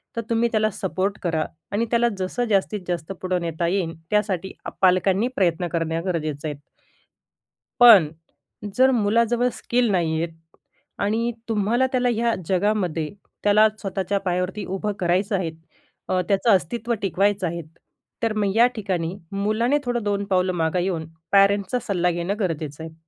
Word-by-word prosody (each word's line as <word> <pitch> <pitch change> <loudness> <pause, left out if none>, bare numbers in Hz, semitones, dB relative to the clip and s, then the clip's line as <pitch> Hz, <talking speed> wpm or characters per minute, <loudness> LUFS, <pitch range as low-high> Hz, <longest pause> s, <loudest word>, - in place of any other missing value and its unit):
तर 230 - -1
तुम्ही 235 0 +2
त्याला 215 -1 +2
सपोर्ट 195 0 -2
करा 160 -3 0 0.3
आणि 210 +3 0
त्याला 235 0 +3
जसं 190 +6 -2
जास्तीत-जास्त 190 -4 -1
पुढं 185 -1 -1
नेता 170 0 -2
येईल 175 -2 -1 0.2
त्यासाठी 195 -3 0 0.3
पालकांनी 190 +3 +3
प्रयत्न 175 -2 +1
करणे 165 -1 -2
गरजेचे 155 -5 -3
आहेत. 145 -2 -4 1.2
पण 225 -10 +9 0.7
जर 260 +1 +6
मुलाजवळ 235 +2 +2
स्किल 240 +1 0
नाहीयेत 165 -2 0 0.7
आणि 225 +4 0 0.2
तुम्हाला 225 +4 +2
त्याला 250 -1 +2
ह्या 230 +1 +1 0.2
जगामध्ये 185 -5 0 0.3
त्याला 210 +1 +6
स्वतःच्या 195 0 -2
पायावरती 180 +2 -2
उभं 195 +3 -3
करायचं 185 +4 +1
आहे. 180 -4 -1 0.6
अ, 185 - +2
त्याचं 200 +4 +2
अस्तित्व 230 +6 -2
टिकवायचं 195 0 +1
आहे. 170 +1 -4 0.6
तर 225 -1 +1
मग 205 -2 0
या 235 +2 +6
ठिकाणी 185 -5 -2 0.2
मुलाने 215 +7 +1 0.2
थोडं 205 -2 -1
पावलं 185 -2 +1
मागे 170 +1 0
येऊन 170 -4 -2 0.2
पॅरेंट्सचा 200 +3 +3
सल्ला 180 -3 +1
घेणं 175 +5 -3
गरजेचं 160 -5 -3
आहे. 160 0 -8
195 Hz, 140 wpm, -23 LUFS, 175-215 Hz, 1.2 s, पण